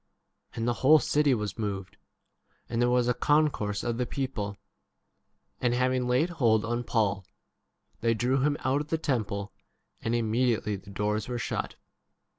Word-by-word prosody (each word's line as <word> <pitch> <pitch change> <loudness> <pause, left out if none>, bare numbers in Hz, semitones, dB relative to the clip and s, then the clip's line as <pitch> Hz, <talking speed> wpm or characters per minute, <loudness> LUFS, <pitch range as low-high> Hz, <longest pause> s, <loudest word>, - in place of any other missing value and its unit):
And 115 0 -2
the 120 - +2
whole 150 +4 +7
city 145 -1 +2
was 105 0 -4
moved, 100 -3 -4 0.7
and 115 0 -1
there 120 - +3
was 125 -1 +2
a 125 - +3
concourse 130 -6 +1
of 120 0 -2
the 125 - 0
people; 110 -8 -3 1.0
and 120 -1 +1
having 130 0 +1
laid 130 +8 +2
hold 115 -9 +2
on 120 +1 -1
Paul 105 -4 0 0.8
they 115 0 +2
drew 125 +4 +1
him 145 +1 +2
out 135 +2 +1
of 150 - -7
the 160 - 0
temple, 105 -9 -2 0.5
and 115 +1 0
imme 120 +1 +2
31 - - -3 0.2
diately - - -22
the 100 - -13
door3 105 +3 -2
were 120 - -2
shut. 120 - -3
120 Hz, 170 wpm, -28 LUFS, 110-130 Hz, 1.0 s, whole